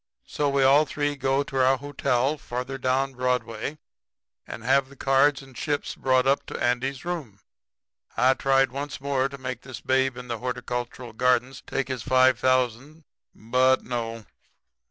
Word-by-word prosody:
So 145 -1 -1
we 140 -1 +2
all 140 +3 +6
three 145 -1 -1
go 135 0 +1
to 135 -2 0
our 130 +1 +4
hotel 135 0 0
further 130 +2 -5
down 135 +1 0
Broadway 125 +1 -2 0.7
and 115 - -8
have 135 +2 +2
the 140 - -15
cards 135 +1 +2
and 135 -2 -16
chips 145 +3 -2
brought 130 -1 +2
up 135 +1 +2
to - - -5
Andy's 125 +3 -1
room. 150 - -5 0.8
I 130 +2 +5
tried 135 -1 +2
once 140 +1 -5
more 135 -1 0
to 140 - -9
make 125 -2 -5
this 130 -4 -9
Babe 130 -1 +1
in 125 0 -8
the 115 -2 -4
Horticultural 125 -1 -4
Gardens 125 +2 +1
take 135 - -2
his 130 -3 -4
five 130 +2 +4
thousand. 130 +4 0 0.3
But 130 +4 +2
no. 115 -2 -4
130 Hz, 160 wpm, -25 LUFS, 125-135 Hz, 0.8 s, all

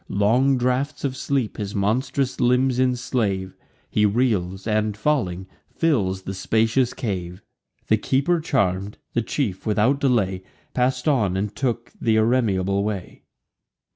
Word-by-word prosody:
Long 125 +7 +3
draughts 130 +4 -1
of 135 -2 -1
sleep 130 -3 -1
his 100 0 -4
monstrous 130 +6 0
limbs 125 +1 +2
enslave; 120 -7 0 0.3
He 105 - +1
reels, 100 -4 +1
and, 105 -1 0
falling, 105 -9 0 0.2
fills 100 - 0
the 95 - -5
spacious 115 +6 +1
cave. 95 -6 -4 0.4
The 110 - +4
keeper 140 +10 +1
charm'd, 100 - 0 0.2
the 120 - +1
chief 110 -5 -2
without 110 +6 +2
delay 105 -9 +1 0.3
Pass'd 125 +1 0
on, 105 -11 +2
and 105 +1 -3
took 120 -3 -2
th' - - -5
irremeable 110 -4 +2
way. 100 -3 -5
110 Hz, 130 wpm, -23 LUFS, 100-130 Hz, 0.4 s, The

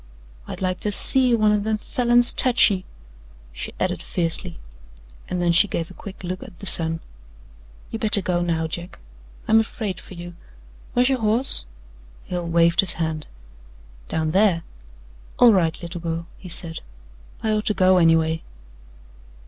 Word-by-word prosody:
"I'd 190 - -7
like 185 -1 -2
to 210 - -2
SEE 250 +4 +6
one 215 -2 +2
o' 210 - +1
them 215 +1 -2
Falins 240 +2 +2
tech 245 -3 +4
ye," 185 -2 -4 0.7
she - - -5
added - - -2
fiercely, 165 - -3 0.7
and 180 - -4
then 175 -1 +1
she 175 +5 +4
gave 170 -2 -5
a - - -12
quick 190 +1 -11
look 185 +1 -5
at 175 - -13
the - - -11
sun. 165 -3 +5 0.9
"You 225 - -5
better 215 -1 +3
go 175 -1 -1
now, 165 -2 -1
Jack. 170 +2 -6 0.5
I'm 220 +1 +4
afraid 220 -3 -4
fer 185 - -13
you. 175 0 -9 0.6
Where's 250 +1 +2
your 265 -1 0
horse?" 220 - +2 0.6
Hale 175 -1 -5
waved 170 0 +2
his 195 - +4
hand. 160 -2 -4 0.8
"Down 160 -1 -2
there. 190 -3 +2 0.7
All 240 -2 +6
right, 165 -4 0
little 170 0 -7
girl," 165 0 -4
he 185 - -12
said. 165 -1 -2 0.6
"I 220 - 0
ought 215 0 -2
to 210 - +1
go, 185 -1 +3
anyway." 165 -1 +2
185 Hz, 160 wpm, -22 LUFS, 165-215 Hz, 0.9 s, SEE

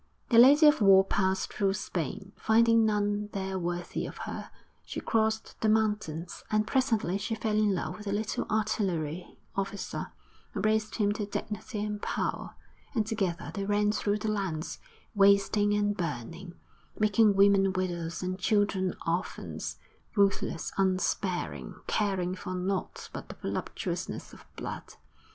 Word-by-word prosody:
The 230 - +6
Lady 285 +6 +8
of 295 -4 +6
War 195 -1 +7
passed 190 -1 0
through 195 -2 +1
Spain, 190 +3 -4
finding 230 0 +4
none 205 0 0
there 190 -1 -2
worthy 175 0 -3
of - - -9
her. - - -6 0.3
She - - -5
crossed 220 -1 0
the 220 - +3
mountains, 210 -7 0
and 215 0 +2
presently 225 -7 +1
she 225 +2 -2
fell 220 -1 -1
in 210 -2 +3
love 180 - -4
with 210 - -9
a - - -1
little 210 +1 -1
artillery 185 -7 -1 0.2
officer, 195 0 -3 0.4
and 200 -1 -1
raised 215 0 +1
him 205 -2 +2
to 210 -1 -3
dignity 210 +1 -4
and 210 -1 -4
power; - - -2 0.4
and 220 -2 +2
together 195 -5 -2
they 200 - -3
ran 205 +1 +2
through 210 -1 0
the 215 0 -1
lands, 185 -6 -3 0.3
wasting 200 0 +4
and 205 0 +1
burning, 170 - -5 0.4
making 215 0 +4
women 195 -1 +5
widows 175 -3 -3
and 185 +1 -3
children 200 -2 +1
orphans, 170 +3 -3 0.4
ruthless, 200 -4 +1
unsparing, 185 +1 0
caring 190 -4 0
for 185 0 -5
naught 185 +1 -3
but - - -7
the - - -7
voluptuousness - - -4
of - - -14
blood. - - -7
200 Hz, 145 wpm, -29 LUFS, 185-215 Hz, 0.4 s, Lady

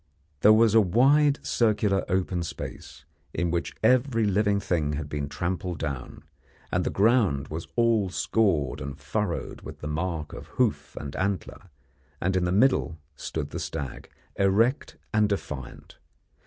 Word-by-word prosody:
There 105 - +7
was 110 0 +5
a 115 - +7
wide 140 - +4
circular 105 -5 +2
open 90 -1 0
space, 85 - -7 0.3
in 85 0 0
which 85 0 -2
every 120 -1 +3
living 100 0 +2
thing 80 -6 -1
had 75 0 -3
been 70 -1 -4
trampled 90 +2 -3
down, 70 -5 -5 0.5
and - - +1
the - - -1
ground 100 - +2
was 80 +2 -5
all 115 -5 +3
scored 90 -8 +1
and 70 0 -6
furrowed 105 +2 -3
with - - -10
the 75 - -4
mark 80 0 -3
of - - -9
hoof 70 -2 0
and 70 -1 -7
antler; 95 -1 -3 0.5
and 95 +2 0
in 90 -1 +2
the 90 - 0
middle 100 -6 +3 0.2
stood - - -5
the - - -4
stag, 70 -3 -5 0.3
erect 110 +8 +2 0.2
and 105 -1 +3
defiant. 75 -10 -6
95 Hz, 150 wpm, -26 LUFS, 75-110 Hz, 0.5 s, There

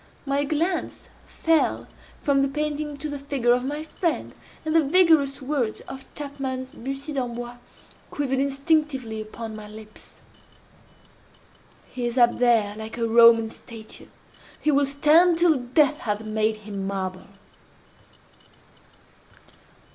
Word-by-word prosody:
My 280 +1 0
glance 330 +5 -2 0.2
fell 325 -1 +1 0.4
from 280 -2 +3
the 275 - +2
painting 295 +1 -3
to 295 +2 -4
the 290 -1 -5
figure 275 -4 +1
of 250 0 0
my 295 +3 -3
friend, 330 +1 -3 0.3
and 315 +1 -1
the 325 - +6
vigorous 295 -4 +3
words 260 -6 -1
of 265 0 -11
Chapman's 270 -3 -5
Bussy 275 +4 -5
D'Ambois, 245 -2 -4 0.5
quivered 270 -2 -1
instinctively 275 -5 0
upon 220 +1 -7
my 215 -1 -9
lips: 215 0 -14 1.7
"He 245 -1 -4
is 240 +2 -3
up 240 -1 +4
There 225 -4 +3
like 220 +1 -7
a 230 -1 0
Roman 230 -1 +6
statue! 225 -2 -12 0.5
He 305 - +1
will 280 -1 +3
stand 315 +5 +4
Till 330 -4 +4
Death 275 +4 +2
hath 210 0 -3
made 215 0 0
him 200 -2 -4
marble!" 190 -2 -4
270 Hz, 125 wpm, -24 LUFS, 230-295 Hz, 1.7 s, the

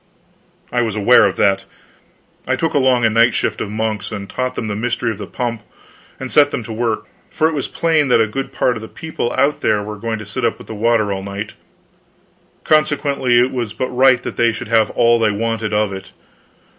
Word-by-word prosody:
I 120 - +1
was 110 -3 -2
aware 110 +4 +5
of - - -3
that. 95 -1 +2 0.8
I 130 - +2
took 165 +4 -1
along 130 -4 +3
a - - +4
night 115 +2 +4
shift - - -1
of 100 - -3
monks, 110 -1 -3
and 100 -2 -6
taught 130 +3 -3
them 110 - -3
the 105 - -3
mystery 120 +1 -1
of 110 - -7
the 100 - -6
pump, 120 -3 -3 0.6
and 130 -1 -6
set 145 -1 +5
them 125 - -4
to 110 - -7
work, 115 -1 -1 0.2
for 155 - +1
it 160 - -2
was 140 -3 -2
plain 160 -3 +1
that 125 - +4
a 110 - +4
good 135 +6 -5
part 125 - +1
of 110 - -6
the 110 - -8
people 160 -5 -4
out 145 +2 +1
there 105 -1 +1
were 105 0 -6
going 115 +1 -3
to 105 - -8
sit 105 +5 -5
up 115 - +1
with - - -12
the - - -8
water 110 -1 +1
all 95 - -4
night, 100 +2 -6 1.1
consequently 145 -5 +2
it 125 +2 +2
was 120 -4 -3
but 130 - -3
right 130 -1 +4
that - - -6
they 115 0 +3
should 110 - -7
have 110 -2 +3
all 120 0 +3
they 110 -1 +3
wanted 110 +1 -2
of 105 -1 0
it. 95 - -8
115 Hz, 225 wpm, -18 LUFS, 105-130 Hz, 1.1 s, aware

